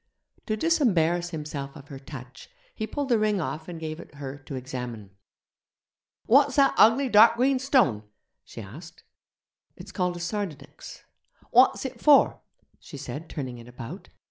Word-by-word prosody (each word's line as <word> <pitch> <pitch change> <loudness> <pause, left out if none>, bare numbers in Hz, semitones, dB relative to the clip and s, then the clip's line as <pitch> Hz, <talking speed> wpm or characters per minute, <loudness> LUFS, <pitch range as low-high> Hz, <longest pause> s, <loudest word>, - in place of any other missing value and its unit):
To 215 -1 -1
disembarrass 175 - +1
himself 150 -4 -6
of 140 - -13
her 135 - -8
touch, 130 -2 -11 0.2
he 215 - -4
pulled 285 +1 -4
the 235 -3 +3
ring 210 -2 +1
off 160 -1 -4
and 170 -2 -7
gave 155 0 -6
it - - -13
her 140 -1 -7
to 140 0 -8
examine. 125 -5 -7 1.1
'What's 275 +2 +4
that 275 -1 +4
ugly 235 +5 +5
dark 225 0 +6
green 260 +2 +2
stone?' 250 - +2 0.4
she - - -10
asked. 160 - -12 0.7
'It's - - -11
called 180 -3 -1
a - - -8
sardonyx.' 175 -6 -6 0.5
'What's - - +4
it - - -7
for?' - - +5 0.4
she - - -11
said, 160 +3 -7
turning 130 -5 -6
it 115 - -13
about. 120 -1 -9
165 Hz, 155 wpm, -26 LUFS, 135-225 Hz, 1.1 s, dark